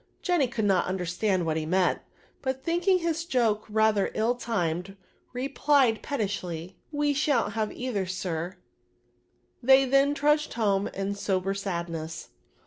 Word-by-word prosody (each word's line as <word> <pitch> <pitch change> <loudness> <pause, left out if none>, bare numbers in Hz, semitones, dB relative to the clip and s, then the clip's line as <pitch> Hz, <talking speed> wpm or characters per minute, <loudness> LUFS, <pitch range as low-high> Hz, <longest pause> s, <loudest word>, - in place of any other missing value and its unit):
" - - -41
Jenny 350 -7 +2
could 230 -3 -2
not 190 -3 +2
understand 185 +1 0
what 160 -1 0
he 155 - -2
meant, 180 +1 +2 0.4
but 265 0 -3
thinking 350 +3 +2
his 335 -2 -1
joke 230 -9 +1
rather 215 -2 +2
ill 225 +3 +2
timed, 195 -6 -2 0.3
replied, 265 -2 +2
pettishly, 190 - -3
" - - -42
We 290 -1 +3
shan't 270 -7 +1
hav 220 -1 0
70 250 - -7
either, 230 -6 -1
ax" 180 -2 -3 1.1
They 265 +2 +6
then 275 +2 +3
truc^d 300 +1 +2
home 205 -3 +1
in 195 +1 -3
sober 195 -1 -1
sadness. 170 -5 -4
215 Hz, 145 wpm, -27 LUFS, 185-270 Hz, 1.1 s, They